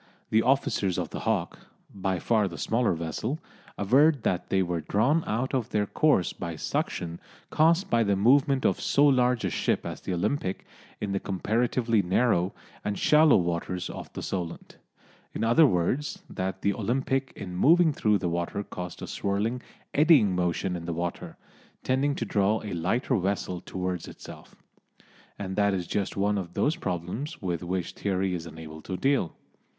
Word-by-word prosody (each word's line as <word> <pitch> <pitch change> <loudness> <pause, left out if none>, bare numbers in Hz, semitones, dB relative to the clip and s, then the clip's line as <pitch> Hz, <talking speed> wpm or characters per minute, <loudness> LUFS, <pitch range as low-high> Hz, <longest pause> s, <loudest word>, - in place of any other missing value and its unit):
The 110 - +5
officers 115 -8 +1
of - - -3
the - - -5
Hawke, - - -1 0.3
by 95 -1 -1
far 105 +3 +2
the 85 - -7
smaller 115 -3 +1
vessel, 85 - -3 0.4
averred 135 +6 +4
that 90 - -1
they 95 -1 +2
were 85 -2 -2
drawn 120 - +2
out 120 +6 -1
of 130 -5 -1
their 105 -1 +1
course 145 - +2
by 85 -2 -5
suction 85 +2 -3 0.3
caused 165 +5 +3
by 115 - +4
the 100 -3 +2
movement 135 +6 +3
of - - +2
so 145 - +3
large 125 -5 +3
a 95 - -1
ship - - 0
as - - -6
the - - -5
Olympic 95 +1 -2 0.3
in 105 - -3
the 100 - 0
comparatively 115 +4 +1
narrow 95 -1 +2 0.3
and 105 -1 -2
shallow 155 0 +5
waters 85 +1 -2
of - - -8
the - - -6
Solent; 90 -3 -5 0.6
in - - -2
other 120 +8 +6
words, 125 +9 -1
that 95 0 -4
the 100 - +2
Olympic 130 +5 -1
in 90 -2 -7
moving 160 - +5
through 105 -5 +2
the 90 - -2
water 85 +4 -2
caused 90 -2 -7
a - - -2
swirling, 105 +5 -1 0.3
eddying 140 - +5
motion 90 +1 0
in 85 -1 -6
the 85 - -3
water, 85 +1 -4 0.5
tending 140 +2 +1
to - - -3
draw 105 +1 +2
a 105 - -5
lighter 105 +10 0
vessel 95 -2 -2
towards 90 -2 -4
itself. - - -12 0.8
And 95 -1 -4
that 100 -1 +3
is 90 -2 -3
just 100 +3 -2
one 100 +1 +1
of 90 -2 -7
those 155 - +2
problems 100 - -4
with 90 -5 -2
which 90 0 -3
theory 95 -1 -1
is 85 -1 -4
unable 80 -1 -9
to 95 - -5
deal. 135 - +1
100 Hz, 170 wpm, -27 LUFS, 90-125 Hz, 0.8 s, other